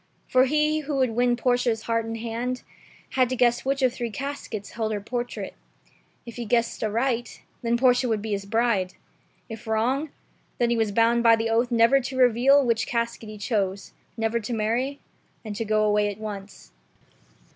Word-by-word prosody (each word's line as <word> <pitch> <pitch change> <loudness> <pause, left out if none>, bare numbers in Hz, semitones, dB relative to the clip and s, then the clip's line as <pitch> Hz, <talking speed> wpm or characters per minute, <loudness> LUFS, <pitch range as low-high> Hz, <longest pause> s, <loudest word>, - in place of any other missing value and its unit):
For 255 0 +4
he 305 +2 +2
who 295 -1 -4
would 260 -3 +2
win 245 +1 +2
Portia's 245 -2 +1
heart 230 -1 0
and 225 0 -4
hand, 235 +2 -3 0.5
had 255 -2 +2
to 255 - -1
guess 240 -1 +2
which 275 0 0
of 255 -2 +3
three 240 -2 -3
caskets 240 -4 -6
held 220 -1 -2
her 210 - -1
portrait. 240 +4 -4 0.7
If 235 0 -10
he 240 - -4
guessed 235 +1 0
aright, 235 +3 -1 0.2
then 235 0 +1
Portia 250 0 +3
would 220 -2 +1
be 215 +1 -5
his 200 -1 -2
bride; 215 -4 +1 0.5
if 225 -1 -9
wrong, 250 +7 0 0.5
then 240 -1 +1
he - - +3
was 220 -2 +1
bound 230 +3 +3
by 230 -1 +6
oath 225 +2 +1
never 235 +3 +5
to 265 0 -5
reveal 260 +3 +5
which 230 -1 +1
casket 235 -2 -2
he 215 - -8
choose, 200 -2 -2 0.2
never 225 +1 0
to 230 +1 -4
worry, 240 +6 -1 0.5
and 210 -1 -5
to 225 - -2
go 215 0 +1
away 210 0 +2
at 200 - -6
once. 205 -2 -8
235 Hz, 180 wpm, -25 LUFS, 220-250 Hz, 0.7 s, by